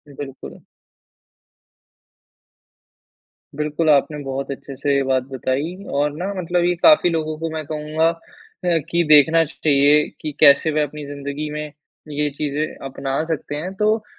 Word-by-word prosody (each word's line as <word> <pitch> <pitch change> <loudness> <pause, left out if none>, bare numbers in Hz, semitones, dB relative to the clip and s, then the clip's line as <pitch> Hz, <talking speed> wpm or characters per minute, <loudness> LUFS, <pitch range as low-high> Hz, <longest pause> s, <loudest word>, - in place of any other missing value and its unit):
बिल्कुल। 135 -2 -9 3.0
बिल्कुल, 150 +2 -1
आपने 150 +1 +3
बहुत 135 +1 -4
अच्छे 135 0 -8
से 140 +1 0
ये 140 - +2
बात 130 -1 +2
बताई 135 +6 -2 0.2
और 145 0 +1
ना 175 - -3 0.2
मतलब 175 0 0
ये 180 - +3
काफ़ी 250 - +5
लोगों 155 -2 -2
को 165 0 -3
मैं 155 -1 -4
कहूँगा 155 +2 -1
अ, 170 - -4 0.5
कि 170 0 +1
देखना 160 +2 +6
चाहिए 145 -1 +3
कि 155 - -4
कैसे 150 +1 +6
वह 150 0 +1
अपनी 150 0 -6
ज़िन्दगी 140 +1 -5
में 150 0 -4 0.4
ये 150 0 -1
चीज़ें 150 0 -1 0.2
अपना 135 +2 -3
सकते 160 -2 -4
हैं, 180 +6 -5
तो 215 +2 +1
150 Hz, 145 wpm, -21 LUFS, 140-160 Hz, 3.0 s, देखना